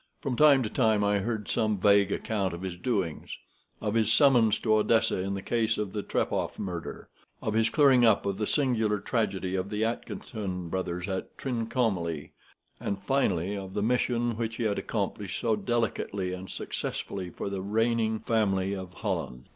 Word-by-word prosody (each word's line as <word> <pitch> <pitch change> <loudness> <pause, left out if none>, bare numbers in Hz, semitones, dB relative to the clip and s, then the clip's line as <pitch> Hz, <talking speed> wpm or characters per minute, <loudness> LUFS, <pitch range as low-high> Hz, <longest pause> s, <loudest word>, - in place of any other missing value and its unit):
From 135 -5 -2
time 140 -1 +6
to 110 - -2
time 110 -4 +2
I 100 0 +2
heard 110 0 -3
some 110 -3 +1
vague 100 0 +4
account 100 -5 -1
of 85 - -8
his 95 -2 -4
doings; 95 -5 -2 0.4
of 105 -1 -2
his 110 -1 +2
summons 120 -6 +5
to 110 - +2
Odessa 110 -1 +3
in 100 +1 -2
the 95 - -5
case 115 -1 +1
of 105 -3 -3
the 105 - -2
Trepoff - - -1
murder, 90 -4 -5 0.3
of 110 - -2
his 110 +1 +3
clearing 135 -1 +5
up 110 -3 +4
of 100 0 -2
the 105 - 0
singular 110 -7 +1
tragedy 95 -5 -1
of 95 +1 -1
the 105 +1 0
Atkinson 100 -5 -4
brothers 90 -1 -3
at 95 -1 -4
Trincomalee, 110 - -1 0.5
and 100 - -2
finally 100 -6 0
of 95 -1 -7
the 100 - 0
mission 120 0 +1
which 115 -1 -2
he 120 - -3
had 105 -2 0
accomplished 100 -2 -3
so 115 -3 +2
delicately 105 -4 -1
and 95 +1 -7
successfully 95 -2 -4
for 100 - -5
the 95 -1 -3
reigning 110 +2 +1
family 100 -4 +1
of 95 -2 -6
Holland. 60 +1 -4
105 Hz, 175 wpm, -28 LUFS, 95-115 Hz, 0.5 s, time